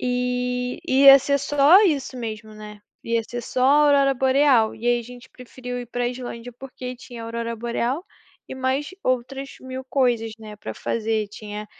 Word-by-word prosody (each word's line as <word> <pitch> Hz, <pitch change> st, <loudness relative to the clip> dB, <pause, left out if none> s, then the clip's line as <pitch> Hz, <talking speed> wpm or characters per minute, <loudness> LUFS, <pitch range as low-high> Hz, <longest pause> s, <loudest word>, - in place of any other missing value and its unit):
E, 250 Hz, 0 st, -2 dB
ia 275 Hz, +1 st, +8 dB
ser 280 Hz, +1 st, 0 dB
só 290 Hz, +8 st, +5 dB
isso 280 Hz, -7 st, 0 dB
mesmo, 220 Hz, -2 st, -6 dB
né. 210 Hz, -1 st, -11 dB, 0.2 s
Ia 230 Hz, 0 st, 0 dB
ser 240 Hz, +2 st, -6 dB
só 250 Hz, +2 st, -3 dB
a -, -, +5 dB, 0.2 s
aurora 275 Hz, -1 st, +4 dB
boreal, 260 Hz, -3 st, +3 dB
e 230 Hz, -, -6 dB
aí 240 Hz, 0 st, +3 dB
a -, -, -8 dB
gente 245 Hz, +2 st, -13 dB
preferiu 250 Hz, 0 st, -8 dB
ir 245 Hz, -, -8 dB
pra 245 Hz, +1 st, -2 dB
Islândia, 245 Hz, -1 st, -6 dB
porque 255 Hz, 0 st, -8 dB
tinha 240 Hz, -2 st, -10 dB
aurora 230 Hz, 0 st, -4 dB
boreal, 240 Hz, +7 st, -2 dB, 0.4 s
e -, -, -6 dB
mais 260 Hz, +2 st, -1 dB
outras 255 Hz, +2 st, -2 dB
mil 260 Hz, 0 st, -7 dB
coisas, 245 Hz, -4 st, 0 dB
né, 215 Hz, -1 st, -10 dB
pra 110 Hz, -, -7 dB
fazer, 220 Hz, -, -2 dB
tinha 210 Hz, 0 st, -8 dB
250 Hz, 175 wpm, -23 LUFS, 230-265 Hz, 0.4 s, ia